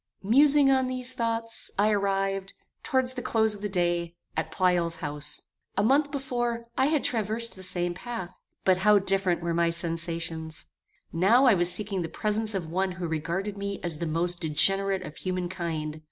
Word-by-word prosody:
Musing 275 +6 +5
on 260 -1 +2
these 255 0 +1
thoughts, 230 -1 -1
I 210 +2 +3
arrived, 195 -1 -1 0.3
towards 260 -1 +1
the 250 - -5
close 220 -2 +2
of 205 - -9
the 205 - -3
day, 175 -2 -1 0.2
at - - -2
Pleyel's 175 -3 +1
house. 150 -3 -4 0.3
A 200 - +3
month 280 +6 +3
before, 240 -4 -3
I 265 - +3
had 305 -2 +1
traversed 230 0 0
the 190 - -11
same 175 -1 +1
path; 205 -2 -6 0.3
but 185 -1 +4
how 210 +2 +5
different 195 -3 +1
were 170 0 -1
my 170 0 +2
sensations! 165 -1 -4 0.5
Now 205 +11 +4
I 250 - +7
was 175 -1 +4
seeking 200 -2 0
the 165 - -4
presence 215 +3 -1
of 185 -4 -2
one 185 +3 -1
who 175 -1 -4
regarded 175 +6 -3
me 200 0 -4
as 165 -3 -2
the 170 - -2
most 170 +3 0
degenerate 190 +5 +2
of 155 -2 -9
human 185 -1 -3
kind. 160 -4 -4
195 Hz, 180 wpm, -27 LUFS, 170-225 Hz, 0.5 s, I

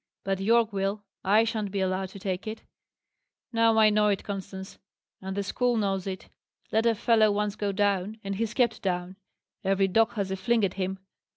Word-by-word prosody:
"But 195 -1 -1
Yorke 225 +2 +3
will. 195 +1 -1 0.2
I 210 +4 +5
shan't 220 -3 -2
be 200 0 -3
allowed 190 0 -1
to 195 - -11
take 185 +1 -3
it. 215 +1 -6 0.9
Now 230 -1 +4
I 215 -1 +6
know 210 0 +3
it, 200 -2 0
Constance, 195 -1 -7 0.4
and 190 +1 -5
the 200 - 0
school 245 +4 0
knows 195 -3 -1
it. 190 -1 -5 0.4
Let 225 +1 +2
a 230 - +3
fellow 220 -1 +4
once 205 0 -1
go 205 -2 -1
down, 200 +1 0
and 195 0 -3
he's 225 0 -2
kept 235 -3 +1
down: 180 0 -2 0.5
every 195 0 +2
dog 225 +4 +3
has 200 -3 -2
a - - 0
fling 225 +2 +2
at 185 - -2
him. 190 0 -3
200 Hz, 195 wpm, -27 LUFS, 190-220 Hz, 0.9 s, I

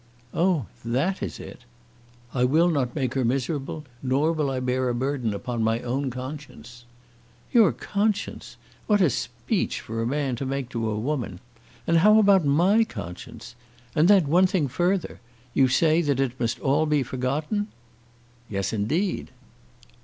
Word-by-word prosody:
"Oh, 170 - +1 0.2
that 135 +12 -1
is - - -4
it!" - - -10 0.7
"I 125 - +1
will 160 +7 +4
not 135 -7 -1
make 130 -4 -1
her 135 - 0
miserable, 135 +4 -2 0.2
nor 135 +5 +1
will 155 -4 0
I 130 -1 -2
bear 130 0 0
a 120 - -1
burden 130 -2 -1
upon 115 +3 -3
my 110 +1 +1
own 130 +3 -2
conscience." 130 -2 -9 0.7
"Your 230 -4 +6
conscience! 210 0 -2 0.3
What 210 -1 +4
a 175 -7 +4
speech - - -2
for 115 +1 -5
a 115 - -1
man 135 -1 -1
to 135 - -3
make 135 -2 -3
to 115 -3 -2
a 105 - -2
woman! 120 - -3 0.5
And 165 - +3
how 210 +5 +6
about 200 -4 +5
my 180 +10 +4
conscience? 115 - -8 0.4
And 155 +3 +4
then 195 -6 +5
one 180 +5 +5
thing 180 -6 0
further. 175 +7 -1 0.3
You 135 - +4
say 160 +5 +3
that 140 -5 0
it 130 -2 -1
must 115 -1 0
be - - -18
all 150 +3 +2
forgotten?" 140 - -2 0.8
"Yes, 100 0 -2
indeed." 155 - -1
135 Hz, 160 wpm, -25 LUFS, 125-170 Hz, 0.8 s, Your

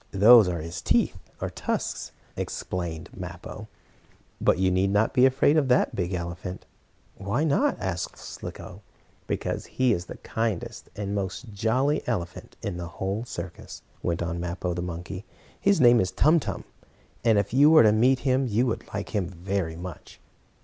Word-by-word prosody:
"Those 105 +2 +8
are 85 -3 -2
his 80 +1 -6
teeth, - - +2 0.2
or - - -3
tusks," - - -3 0.2
explained 85 -1 -4
Mappo. 90 -1 -8 0.7
"But - - +4
you 95 0 +2
need 95 +2 +2
not 105 +3 +2
be 130 0 +6
afraid 135 +3 +3
of 145 -3 +3
that 125 0 +3
big 90 0 -1
elephant." 90 +1 -5 0.5
"Why 100 +9 -1
not?" 250 - +2
asked 90 -2 -3
Slicko. 95 +3 -9 0.5
"Because - - -3
he 130 -2 +2
is 90 -3 -3
the - - -9
kindest, 110 -5 -3
and 100 -1 -3
most 100 +3 -4
jolly 125 +8 +1
elephant 90 -8 -4
in 90 - -3
the 85 -1 -5
whole 95 +6 -3
circus," 90 -7 -8 0.2
went 85 0 -1
on 85 0 -3
Mappo 90 +1 -3
the 85 - -3
monkey. 90 +2 -6 0.4
"His 200 -1 +3
name 120 -2 +7
is 95 - 0
Tum 155 - +4
Tum, - - -5 0.6
and 115 -2 +4
if 100 +2 0
you 145 +3 +7
were 160 -3 +8
to 110 - +6
meet 125 +4 +3
him 130 -1 +2
you 115 +3 +2
would 115 - -3
like 100 - -3
him 100 -5 -1
very 90 -1 -3
much." 90 0 -9
100 Hz, 170 wpm, -26 LUFS, 90-120 Hz, 0.7 s, Those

